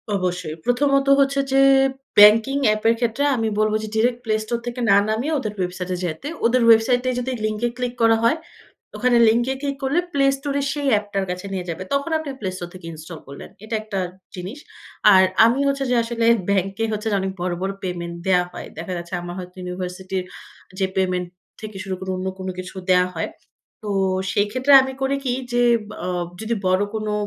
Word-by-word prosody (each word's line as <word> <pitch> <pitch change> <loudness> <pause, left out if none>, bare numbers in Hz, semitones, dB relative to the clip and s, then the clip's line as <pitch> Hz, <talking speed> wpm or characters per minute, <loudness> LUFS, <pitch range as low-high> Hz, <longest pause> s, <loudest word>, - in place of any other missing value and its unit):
অবশ্যই, 180 -4 -2
প্রথমত 275 +2 +2
হচ্ছে 275 0 +2
যে 270 0 +4 0.6
ব্যাংকিং 220 +6 +7
এ্যাপের 215 +2 +3
ক্ষেত্রে 240 +3 0
আমি 225 -2 -1
বলব 215 0 +2
যে - - -4
ডিরেক্ট 240 +2 +2
প্লে 215 -1 +1
স্টোর 235 +2 -2
থেকে 240 +1 -4
না 200 - +7
নামিয়ে 240 +9 -1
ওদের 215 -5 -4
ওয়েবসাইটে 180 0 -3
যাইতে। 170 - -4 0.2
ওদের 245 +2 +3
ওয়েবসাইটেই 245 +3 +4
যদি 250 +1 -3
লিঙ্কে 215 +2 -1
ক্লিক 250 -1 -2
করা 225 0 +5
হয়, 260 +8 +3 0.6
ওখানে 250 -1 +3
লিঙ্কে 240 +4 +2
ক্লিক 280 -1 -2
করলে 275 +6 +2
প্লে 275 -1 +3
স্টোরে 280 0 -2
সেই 285 0 -2
অ্যাপটার 205 -2 0
কাছে 180 +2 -6
নিয়ে 180 -2 -4
যাবে। 170 +2 -4
তখন 280 +4 -1
আপনি 315 -2 -6
প্লে 190 - -2
স্টোর 175 -1 -6
থেকে 185 -2 -12
ইনস্টল 160 +1 -9
করলেন। 140 0 -10
এটা 220 +1 -3
একটা 210 -3 -4 0.4
জিনিস। 190 +10 -7 0.5
আর 190 0 +7 0.2
আমি 235 +4 +2
হচ্ছে 275 0 0
যে - - +3
আসলে 230 0 -2 0.2
ব্যাংকে 195 +2 0
হচ্ছে 215 +1 -3
যে - - +2
অনেক 190 0 -2
বড়, 180 0 -1
বড় 190 +1 -1
পেমেন্ট 170 -2 -4
দেয়া 180 -1 +4
হয়। - - -8
দেখা 170 +3 -5
যাচ্ছে 170 +1 -8
আমার 175 0 -6
হয়তো 180 0 -9
ইউনিভার্সিটির 180 +1 -4 0.6
যে 190 - +2
পেমেন্ট 180 -1 0 0.3
থেকে 215 -2 -8
শুরু 190 -1 -3
করে 190 - -6
অন্য 185 +1 -4
কোন 190 - -5
কিছু 185 +1 -8
দেয়া 180 0 +4
হয়। 165 - -2 0.5
তো 210 - -6 0.4
সেক্ষেত্রে 250 +7 +1
আমি 265 0 -4
করি 270 +1 +1
কি 255 - 0 0.2
যে 245 0 +2 0.4
আ - - -2 0.3
যদি 220 +1 -1
বড় 185 +2 +3
কোনো 215 -1 -2
215 Hz, 190 wpm, -22 LUFS, 185-245 Hz, 0.6 s, ব্যাংকিং